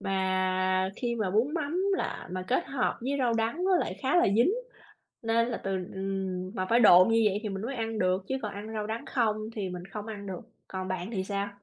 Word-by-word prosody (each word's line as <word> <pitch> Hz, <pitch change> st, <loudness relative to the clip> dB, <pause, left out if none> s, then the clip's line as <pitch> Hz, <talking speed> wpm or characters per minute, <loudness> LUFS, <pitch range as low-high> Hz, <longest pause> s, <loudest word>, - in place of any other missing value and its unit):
Mà 185 Hz, -1 st, +1 dB
khi 240 Hz, -2 st, -1 dB
mà 215 Hz, -5 st, -1 dB
bún 240 Hz, -, +2 dB
mắm 320 Hz, +1 st, -1 dB, 0.2 s
là -, -, -4 dB
mà 185 Hz, 0 st, -3 dB
kết 255 Hz, -, +1 dB
hợp 275 Hz, -2 st, 0 dB
với 260 Hz, +4 st, -2 dB
rau 245 Hz, -3 st, +2 dB
đắng 230 Hz, +10 st, 0 dB
nó 375 Hz, -1 st, +4 dB
lại -, -, -1 dB
khá 270 Hz, +6 st, +2 dB
là 350 Hz, -, +6 dB
dính, 240 Hz, +9 st, +5 dB, 0.7 s
nên 230 Hz, +1 st, +2 dB
là 235 Hz, -, -3 dB
từ 195 Hz, -, -1 dB, 0.2 s
ừm, 190 Hz, -1 st, -3 dB
mà 185 Hz, -1 st, -1 dB
phải 235 Hz, +1 st, +5 dB
độn 185 Hz, -2 st, +8 dB
như 225 Hz, 0 st, +4 dB
vậy 200 Hz, 0 st, -1 dB
thì 215 Hz, -, -2 dB
mình 195 Hz, +1 st, -4 dB
mới 265 Hz, +3 st, -3 dB
ăn 225 Hz, -1 st, -2 dB
được 185 Hz, 0 st, +1 dB
chứ 265 Hz, -, 0 dB
còn 210 Hz, -, -3 dB
ăn 210 Hz, +2 st, -7 dB
rau 210 Hz, -1 st, -2 dB
đắng 225 Hz, +1 st, -4 dB
không 220 Hz, -4 st, +1 dB, 0.2 s
thì 195 Hz, -3 st, -2 dB
mình 180 Hz, 0 st, -6 dB
không 210 Hz, +2 st, -7 dB
ăn 205 Hz, -2 st, -6 dB
được. 190 Hz, -2 st, -5 dB, 0.3 s
Còn 185 Hz, 0 st, -4 dB
bạn 185 Hz, +2 st, -3 dB
thì 190 Hz, -4 st, -2 dB
sao? 200 Hz, 0 st, -2 dB
210 Hz, 235 wpm, -29 LUFS, 190-235 Hz, 0.7 s, độn